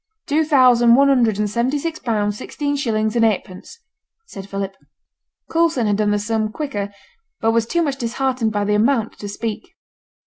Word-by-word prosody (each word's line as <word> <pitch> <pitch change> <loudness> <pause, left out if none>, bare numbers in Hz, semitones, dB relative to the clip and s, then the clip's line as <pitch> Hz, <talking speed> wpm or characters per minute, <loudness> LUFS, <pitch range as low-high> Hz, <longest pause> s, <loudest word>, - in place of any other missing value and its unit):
'Two 305 +2 +1
thousand 250 -5 +5
one 275 +2 +5
hundred 235 -6 +3
and 210 0 0
seventy 240 +7 0
six 320 +2 -4
pounds, 210 -4 -1
sixteen 285 +5 -3
shillings 220 -5 -1
and 230 - +3
eightpence,' 205 - -2 0.5
said 195 - -10
Philip. 195 -1 -4 0.8
Coulson 325 -7 +2
had 205 -1 +1
done 210 -1 +1
the 205 - +2
sum 215 +1 -1
quicker, 215 -8 -4 0.5
but 225 - +2
was 230 0 +1
too 340 +6 +1
much 280 -3 -2
disheartened 240 -1 -1
by 205 -1 -1
the 210 - +1
amount 225 +1 +1
to 205 - -6
speak. 230 - -5
230 Hz, 175 wpm, -20 LUFS, 210-275 Hz, 0.8 s, thousand